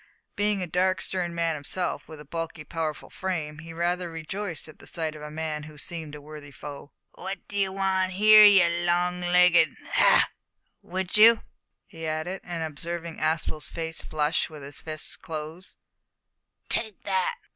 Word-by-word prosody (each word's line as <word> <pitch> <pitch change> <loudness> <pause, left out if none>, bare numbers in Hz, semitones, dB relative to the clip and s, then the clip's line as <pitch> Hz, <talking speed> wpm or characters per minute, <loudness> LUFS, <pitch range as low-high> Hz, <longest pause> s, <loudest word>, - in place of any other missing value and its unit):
Being 205 -2 +2
a - - -4
dark, 185 +2 +1
stern 175 -1 -2
man 165 -1 +1
himself, 150 +1 -3
with 155 -1 -10
a 150 - -11
bulky 165 +1 -5
powerful 155 -2 -4
frame, 160 -5 -3
he 165 +1 -9
rather 175 +1 -1
rejoiced 165 +1 -5
in 155 - -13
the - - -11
sight 160 -2 -3
of 150 - -10
a 150 - -7
man 155 0 -3
who 150 - -14
seemed 155 0 -6
a 150 - -10
worthy 150 -1 -10
foe. 145 0 -9 0.2
"What 190 0 -7
d'ee 200 -1 0
wan' 190 -1 0
here, 215 +3 +8
you 195 -4 +8 0.2
long 175 +1 +1
legged 175 -3 +5 0.2
hah! - - +5 0.6
would 185 +2 -3
you?" 225 +2 +8 0.4
he 165 -1 -7
added, 155 +5 -3
on 170 -2 -4
observing 165 +2 -5
Aspel's 155 -1 -1
face 165 -1 -5
flush 155 +3 0
and 155 -3 -10
his 140 +1 -6
fists 155 -1 0
close, 160 +1 -7 0.9
"Take 215 -4 -1
that!" 190 -2 0
170 Hz, 165 wpm, -26 LUFS, 155-185 Hz, 0.9 s, here